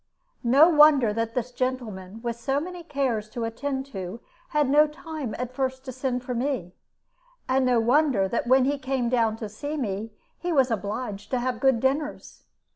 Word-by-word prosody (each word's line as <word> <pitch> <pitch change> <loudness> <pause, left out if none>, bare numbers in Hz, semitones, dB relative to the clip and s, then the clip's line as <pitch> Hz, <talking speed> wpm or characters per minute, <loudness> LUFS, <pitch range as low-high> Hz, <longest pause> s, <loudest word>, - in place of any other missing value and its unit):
No 270 +7 +6
wonder 295 -8 +6
that 230 +1 -2
this 250 0 -2
gentleman, 225 -5 -4
with 235 -1 -2
so 270 +4 -1
many 355 +3 -6
cares 270 -9 -2
to 235 +1 -4
attend 265 +4 -3
to, 190 +3 -5 0.3
had 300 -2 +2
no 295 +3 +5
time 300 -6 -6
at 250 0 -4
first 260 0 -2
to 260 - -5
send 255 -1 -2
for 250 - -4
me. 240 -8 -2 0.7
And 260 0 +2
no 245 -2 +4
wonder 245 -4 +3
that 235 +4 -2
when 260 +1 +5
he 285 +1 0
came 260 -2 -1
down 230 -3 +1
to 225 - -5
see 290 +9 -5
me, 220 -3 -3 0.3
he 350 - -2
was 265 -5 +3
obliged 205 -1 -4
to 255 - 0
have 245 -1 -2
good 265 -3 +3
dinners. 280 +4 -2
255 Hz, 185 wpm, -26 LUFS, 225-275 Hz, 0.7 s, No